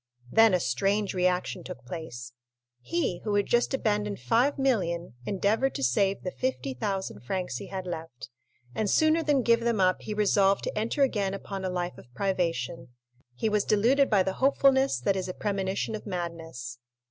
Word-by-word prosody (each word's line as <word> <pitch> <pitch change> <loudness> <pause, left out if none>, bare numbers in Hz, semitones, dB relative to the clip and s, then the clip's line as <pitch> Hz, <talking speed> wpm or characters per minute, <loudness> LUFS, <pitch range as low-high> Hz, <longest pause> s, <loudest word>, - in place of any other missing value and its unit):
Then 225 -3 +6
a - - +2
strange 200 +3 0
reaction 180 0 0
took 180 - -9
place; 125 -9 -7 0.5
he 170 +7 -1
who 210 -2 -1
had 205 -1 +2
just 240 0 +2
abandoned 210 -4 -1
5,000,000 230 - +1
endeavored 210 +7 +1
to - - -3
save 195 +11 +1
the 185 - -3
50,000 130 - -3
francs 155 - -3
he - - -7
had 190 -1 -5
left, 165 -7 -7 0.4
and 210 +8 -1
sooner 315 +6 +4
than 290 -4 +2
give 230 0 +4
them 235 -2 0
up 185 -1 +3
he 210 - -5
resolved 200 -1 +3
to - - -3
enter 230 +6 +1
again 200 -7 0
upon 195 -1 -6
a 185 - -1
life 180 -1 -3
of 120 - -16
privation—he 125 - -3
was 210 -1 +2
deluded 250 +7 +3
by 200 -4 +4
the 190 0 -2
hopefulness 270 0 +4
that 200 - +1
is 185 -1 -2
a 185 - -5
premonition 195 0 -2
of 215 - -6
madness. 165 -9 -5
195 Hz, 170 wpm, -28 LUFS, 170-215 Hz, 0.5 s, Then